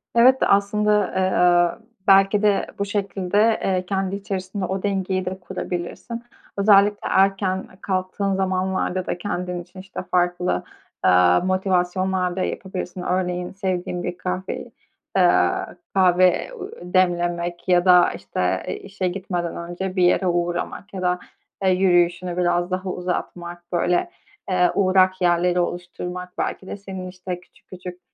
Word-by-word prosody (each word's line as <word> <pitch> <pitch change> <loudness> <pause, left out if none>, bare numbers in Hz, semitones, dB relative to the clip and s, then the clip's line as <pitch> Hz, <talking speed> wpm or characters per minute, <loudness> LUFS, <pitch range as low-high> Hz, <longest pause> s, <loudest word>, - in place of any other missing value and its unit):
Evet 255 +3 +6
de, - - +4
aslında, 210 +1 +3
eee, 180 +1 +3 0.2
belki 195 +1 +5
de 210 -2 +2
bu 200 - 0
şekilde, 205 +2 +1
eee, 185 -1 0
kendi 195 0 -1
içerisinde 195 -1 -4
o 190 +1 -3
dengeyi 190 -2 -1
de 185 +1 -4
kurabilirsin. 180 +5 -5 0.3
Özellikle 200 0 +5
erken 190 -1 +2
kalktığın 190 +1 -1
zamanlarda 185 -1 -1
da - - -2
kendin 180 -1 -3
için, 175 +2 -13
işte, 185 0 -7
farklı, 175 - +1 0.4
eee, 90 -1 +5
motivasyonlar 185 -1 0
da 190 - -2
yapabilirsin. 185 -1 -5
Örneğin, 180 -1 -1
sevdiğin 185 -2 -3
bir 175 0 -4
kahveyi, 185 +1 -4 0.5
eee, - - +4 0.4
kahve 185 - +4 0.3
demlemek 175 -1 0
ya 180 -1 +4
da, 180 -1 +6
işte, - - -2
eee, - - -2
işe 195 - -4
gitmeden 180 -2 -3
önce 175 +2 -5
bir 185 - +2
yere 180 +1 +3
uğramak 175 +3 -2
ya 190 - -5
da, 180 0 +1 0.4
eee, 190 - +4
yürüyüşünü 180 -1 +2
biraz 175 0 +1
daha 185 +1 -2
uzatmak, 175 -1 -4
böyle, 175 - +1 0.4
eee, 180 -1 +3
uğrak 185 -1 +3
yerleri 175 0 +3
oluşturmak 180 +1 -4
belki 190 - -3
de - - -5
senin, 190 -2 -7
işte, 180 -1 -6
küçük 180 - -26
küçük 180 -1 -9
185 Hz, 135 wpm, -22 LUFS, 180-195 Hz, 0.5 s, Evet